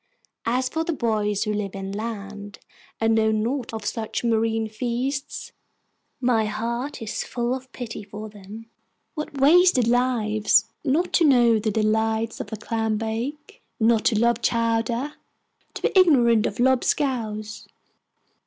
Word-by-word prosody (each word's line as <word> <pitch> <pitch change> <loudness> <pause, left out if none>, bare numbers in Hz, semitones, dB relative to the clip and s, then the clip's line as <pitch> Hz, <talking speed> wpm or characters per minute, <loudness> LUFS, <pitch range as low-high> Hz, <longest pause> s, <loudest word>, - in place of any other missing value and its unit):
As 255 +2 +1
for 320 +5 -2
the 335 0 -2
boys 215 -6 0
who 210 -1 -1
live 205 -2 -3
inland, 205 0 -6 0.4
and 225 0 +2
know 220 0 +3
naught 230 +4 -1
of 220 -2 -6
such 220 +1 -3
marine 225 -1 +1
feasts, 250 +5 -3 0.7
my 240 -4 +2
heart 235 +5 -3
is 215 - -3
full 240 0 -2
of 260 0 -7
pity 235 -5 -6
for 210 +1 -8
them. 210 +2 -11 0.5
What 300 -3 -6
wasted 300 -3 +5
lives! 220 -4 +2 0.2
Not 315 +5 0
to 340 - +4
know 240 -6 +5
the 215 +1 -1
delights 220 +1 0
of - - -6
a - - -2
clam 225 0 -1
bake, 235 +7 -5 0.2
not 225 -1 +3
to 220 - +3
love 235 +1 +2
chowder, 230 +4 0 0.6
to - - -6
be - - +2
ignorant 245 - +5
of - - -6
lob 260 0 +3
scouse! 220 -6 -2
225 Hz, 145 wpm, -24 LUFS, 215-255 Hz, 0.7 s, wasted